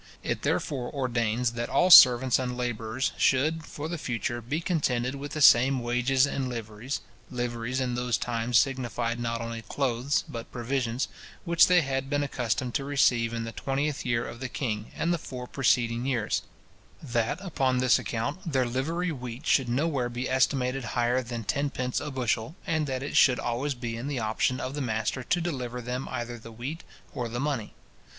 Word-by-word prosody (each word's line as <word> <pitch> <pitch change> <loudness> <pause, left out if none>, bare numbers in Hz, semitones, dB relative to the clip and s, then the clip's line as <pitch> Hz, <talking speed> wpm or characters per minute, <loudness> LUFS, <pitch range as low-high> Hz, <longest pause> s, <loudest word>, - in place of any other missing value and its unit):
It - - -2
therefore 130 -4 -1
ordains, 120 -3 0
that 120 0 -4
all 180 +1 +3
servants 125 -4 +9
and 125 -1 -3
labourers 120 +1 -2
should, 155 +5 +2
for 150 -1 -6
the 170 0 -4
future, 120 -2 -3
be 135 +8 -2
contented 130 -8 0
with 140 +1 -6
the 155 - +1
same 130 +2 +7
wages 125 +3 +2
and 135 -2 -2
liveries 115 +2 -5 0.3
(liveries 120 0 -3
in 125 -2 -1
those 125 0 0
times 120 0 0
signified 120 -3 0
not 115 -1 -2
only 115 0 -5
clothes, 130 +2 0
but 115 -1 -7
provisions) 125 0 -1 0.4
which 170 -1 +5
they 180 -1 +5
had 135 -2 -2
been 145 0 +1
accustomed 125 -2 -2
to 140 - -1
receive 125 -5 +2
in 115 -1 -3
the 115 0 -6
20th 140 +2 -2
year 120 -1 0
of 120 - -8
the 130 -1 -4
king, 110 -5 -3
and 170 +1 0
the 170 - -1
four 125 -3 -7
preceding 125 -2 +1
years; 120 -6 0 0.6
that, 120 +3 -1
upon 135 -9 0
this 125 0 +4
account, 145 +10 -3
their 130 -2 +2
livery 160 +9 -1
wheat 125 0 -7
should 135 -6 +3
nowhere 135 -1 0
be 120 +2 -3
estimated 130 0 +1
higher 120 +1 +2
than 120 -2 -5
tenpence 130 +1 -1
a 150 - -5
bushel, 125 0 -1
and 160 -5 0
that 130 -1 -3
it 145 - -5
should 125 -2 +5
always 130 +4 -2
be 120 -2 -4
in 120 +4 -5
the 145 -2 -2
option 115 +3 0
of 130 - -4
the 145 - -3
master 110 +1 -1
to 175 +8 0
deliver 130 -8 -3
them 125 +2 -4
either 120 -1 -4
the 115 +1 -11
wheat 130 +9 -6 0.3
or 125 -4 -3
the 120 +2 -4
money. 135 -6 -2
125 Hz, 185 wpm, -27 LUFS, 120-140 Hz, 0.6 s, servants